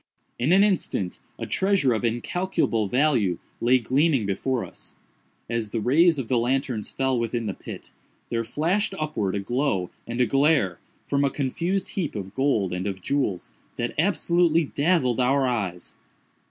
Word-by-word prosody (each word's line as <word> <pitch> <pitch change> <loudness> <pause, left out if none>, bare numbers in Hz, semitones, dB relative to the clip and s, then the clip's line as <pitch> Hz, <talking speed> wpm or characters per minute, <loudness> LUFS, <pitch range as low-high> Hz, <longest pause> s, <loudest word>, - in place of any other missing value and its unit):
In 130 +7 +1
an 195 +2 +6
instant, 180 - 0 0.2
a - - -4
treasure 190 -10 +2
of 110 - -2
incalculable 120 - 0
value 120 - +2 0.2
lay 125 +2 +4
gleaming 135 +1 +2
before 120 +6 -1
us. - - -11 0.5
As 115 -2 -2
the 115 - -2
rays 160 +9 +4
of 130 -4 -3
the 125 0 +2
lanterns 125 -2 -1
fell 130 -2 0
within 115 0 -2
the 100 - -2
pit, - - -10 0.4
there 115 -1 0
flashed 170 - 0
upwards 105 -11 -1
a - - -2
glow 120 -5 -1 0.2
and 120 +1 -4
a 125 - +5
glare, 135 - +2 0.3
from 140 0 +1
a 140 - +3
confused 165 +8 -2
heap 180 - -3
of 95 -1 -5
gold 130 -9 +1
and 90 +2 -2
of 95 -2 -4
jewels, 130 -11 -1 0.3
that 120 0 -2
absolutely 170 -2 +3
dazzled 145 -4 +1
our 135 +2 +3
eyes. 100 -8 -3
130 Hz, 160 wpm, -25 LUFS, 110-155 Hz, 0.5 s, an